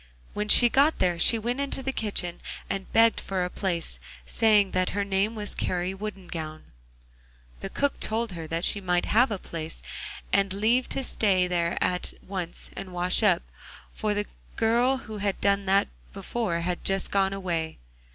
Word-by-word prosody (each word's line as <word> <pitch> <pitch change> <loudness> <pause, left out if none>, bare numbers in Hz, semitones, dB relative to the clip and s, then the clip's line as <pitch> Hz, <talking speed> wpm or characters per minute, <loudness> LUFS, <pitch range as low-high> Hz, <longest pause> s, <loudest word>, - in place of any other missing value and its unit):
When 210 0 -2
she 240 +3 +8
got 280 +6 +3
there 175 -2 +1
she 230 - +6
went 240 +4 -2
into 275 -1 -3
the 270 - -1
kitchen 195 -7 -2 0.3
and 195 -1 -4
begged 225 0 +5
for 185 -2 -1
a 180 - -5
place, 170 - -2 0.3
saying 210 - +3
that 185 0 +1
her 200 - +2
name 200 +3 0
was 210 -1 -2
Kari 180 +1 -1
Woodengown. 180 -6 -6 1.0
The - - -5
cook 285 0 -1
told 225 0 0
her 165 -3 -6
that 165 +2 0
she 200 - +2
might 180 -1 +1
have 245 +5 +4
a 210 - -2
place 165 -3 -7 0.5
and 195 -1 +3
leave 225 +5 +2
to 270 - -2
stay 195 -7 +2
there 170 -1 0
at 180 0 -1
once 185 -3 -5
and 190 - -6
wash 180 +3 +1
up, 190 -6 +3 0.5
for 210 -1 -1
the 205 0 -1 0.3
girl 240 +4 +3
who 220 -5 -8
had 200 -1 -1
done 200 -1 +1
that 195 +1 +4 0.3
before 200 -8 -2
had 175 +1 -2
just 195 -1 0
gone 195 -1 +2
away. 170 -5 -3
195 Hz, 175 wpm, -27 LUFS, 180-220 Hz, 1.0 s, she